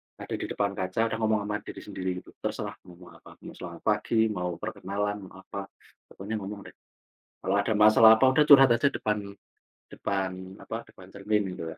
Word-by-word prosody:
ada - - -11
di - - -3
depan 100 -1 -1
kaca, 95 +2 -3
ada 115 - -1
ngomong 110 -1 +1
ama 105 +1 -3
diri 105 - -10
sendiri 95 -2 -4
gitu, - - -16
terserah - - -4
ngomong 90 0 -15
apa, - - -16
mau - - -8
selamat - - -9
pagi, 110 -1 +2
mau 90 -3 -3
perkenalan, 105 0 -4
mau 95 +1 -14
apa, 100 -1 -7 0.4
pokoknya 105 +3 -5
ngomong 100 +1 -6
deh. - - -39 0.7
Kalau 95 - 0
ada 105 +2 +1
masalah 110 +1 +7
apa, 130 +4 +4
udah 150 +3 +4
curhat 135 -3 +8
aja 120 +4 +3
depan 105 -6 -2 0.6
depan 95 -1 -4
apa, 115 +1 -6
depan 90 - -15
cermin 100 -1 -1
gitu 80 - -6
ya. - - -11
100 Hz, 190 wpm, -27 LUFS, 95-110 Hz, 0.7 s, curhat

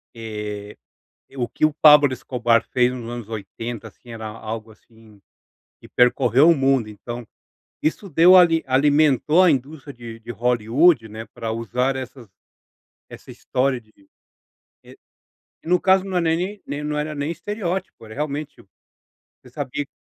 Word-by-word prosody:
E, 105 -2 -7 0.6
o 120 -2 -2
que - - -2
o 155 - -3
Pablo 150 -3 +7
Escobar 120 -2 0
fez 125 0 +2
nos 120 -2 -7
anos 120 -3 -7
80 115 +2 -7
assim 120 +4 -18
era 110 -1 -7
algo 110 +1 -7
assim 110 -1 -21 0.6
que - - -14
percorreu 125 +3 +3
o 170 - +5
mundo 135 -4 +1
então, 120 +3 -8 0.6
isso 165 +6 -2
deu 170 +4 +6
ali 165 -3 +5
alimentou 145 +3 +3
a 180 - +5
indústria 140 +1 -3
de 115 -2 -10
de 115 +1 -8
Hollywood, 120 - +2
né, 110 +1 -8
para 115 -1 -4
usar 125 +4 -1
essas 130 -3 -8 0.8
essa - - -12
história 130 0 -1
de, 110 -2 -28 0.9
e, - - -16 0.7
e - - -13
no 180 +1 +3
caso 190 0 +4
não 190 -2 -2
é - - +2
nem 180 +5 -1
nem 145 +1 -5
não 150 0 -3
era 150 +1 -4
nem 145 +2 -3
estereótipo 190 - -5
era 110 - -11
realmente, 150 +2 -5 0.8
você - - -17
sabia 145 +3 -4
130 Hz, 155 wpm, -22 LUFS, 115-155 Hz, 0.9 s, Pablo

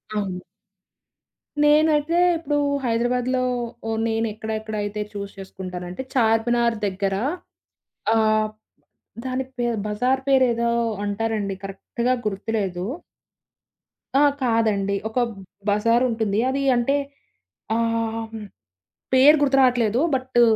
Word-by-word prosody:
అవును. 195 -3 -2 1.2
నేనైతే 300 +2 +4 0.2
ఇప్పుడు 310 -3 -1 0.3
హైదరాబాద్‌లో 250 +2 +1 0.6
నేను 225 0 0
ఎక్కడెక్కడ 220 0 -5
అయితే 205 +1 -3
చూస్ 200 -1 -5
చేసుకుంటానంటే 185 0 -7
చార్మినార్ 235 0 +2
దగ్గర 195 0 -1 1.0
ఆహ్, 215 -1 +3 0.8
దాని 260 0 -2
పేరు 240 -1 0
బజార్ 250 +6 +1
పేరేదో 240 -3 +3 0.3
అంటారండి 205 -1 -1
కరెక్ట్‌గ 195 +5 -5 0.2
గుర్తులేదు. 195 -3 -2 1.3
ఆ! - - +6 0.2
కాదండి 220 -5 +1
ఒక 225 - -1 0.5
బజార్ 230 +4 +3
ఉంటుంది 220 -3 0
అది 275 +1 -1
అంటే 240 +4 +2 0.8
ఆహ్, 225 -1 -1 0.8
పేరు 280 +4 +7
గుర్తు 275 -2 +3
రాట్లేదు 245 -3 +3 0.2
బట్టు 255 -2 +1
225 Hz, 90 wpm, -23 LUFS, 210-250 Hz, 1.3 s, పేరు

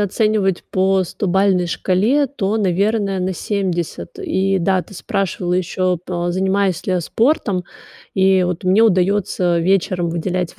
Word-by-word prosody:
оценивать 205 -2 0
по 190 0 +2
стобалльной 185 0 +1
шкале, 215 - +1
то, 220 -6 -2
наверное, 200 0 0
на 185 +1 -1
70. 185 - -3
И 195 - 0
да, 185 +1 +1
ты 200 - -17
спрашивала 180 -1 -2
ещё 185 0 0
по 175 -1 -2
занимаюсь 190 0 0
ли 185 - +1
я 180 - 0
спортом? 210 - 0 0.5
И 190 -1 +3
вот 180 +1 -3
мне 190 +4 +4
удаётся 185 -3 +2
вечером 185 -1 +1
выделять 175 +1 -3
190 Hz, 135 wpm, -19 LUFS, 180-200 Hz, 0.5 s, мне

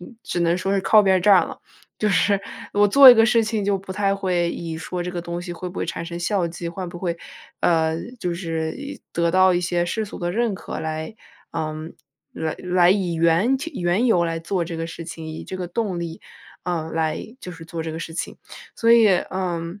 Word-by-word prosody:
嗯， 180 +6 -12
只 175 - -2
能 170 +1 +2
说 195 +1 0
是 195 - +2
靠 215 +2 +5
边 190 -1 +4
儿 - - +1
站 195 0 +5
了。 - - -9 0.4
就 215 - +1
是 200 0 +2 0.3
我 205 0 +4
做 270 +6 +9
一 250 - +11
个 225 -1 +5
事 230 0 +3
情 215 -1 -1
就 200 -1 +1
不 190 0 -8
太 195 0 +1
会 180 -3 0
以 165 -2 -5
说 175 +2 -4
这 - - -4
个 175 - -4
东 170 0 -4
西 175 0 -6
会 180 +1 -6
不 180 - -12
会 - - -2
产 165 - -4
生 170 0 -6
效 175 0 0
绩， 170 0 -6
会 180 +1 -5
不 175 - -8
会， 170 -2 -2 0.4
呃， 160 -1 +2 0.2
就 175 -4 -2
是 165 -2 -3
一 285 +1 -8
得 170 0 +1
到 185 +1 +5
一 175 - +1
些 175 -1 0
世 220 +5 -2
俗 205 - -9
的 175 -1 -2
认 230 +2 +1
可 - - -6
来 160 +4 -4 0.4
嗯， 155 0 -4 0.4
来 160 -1 -3
来 180 -1 +3
以 185 -3 +1
缘 170 +10 +3
其 310 +5 -6
缘 175 +6 +2
由 175 -7 +3
来 165 -1 -2
做 175 +2 -1
这 165 0 -6
个 165 - -3
事 170 0 -8
情， 160 -1 -7
以 155 - -7
这 185 - -6
个 180 -2 -5
动 190 -3 -2
力， 165 -1 -6 0.4
嗯， 165 -3 -2
来 160 +8 -2
就 180 - -7
是 165 - -11
做 165 0 -5
这 160 - -4
个 160 - -5
事 165 - -6
情。 175 - -4 0.4
所 230 - +2
以， 230 -2 +7 0.2
嗯 175 0 -3
175 Hz, 250 characters per minute, -22 LUFS, 165-195 Hz, 0.4 s, 一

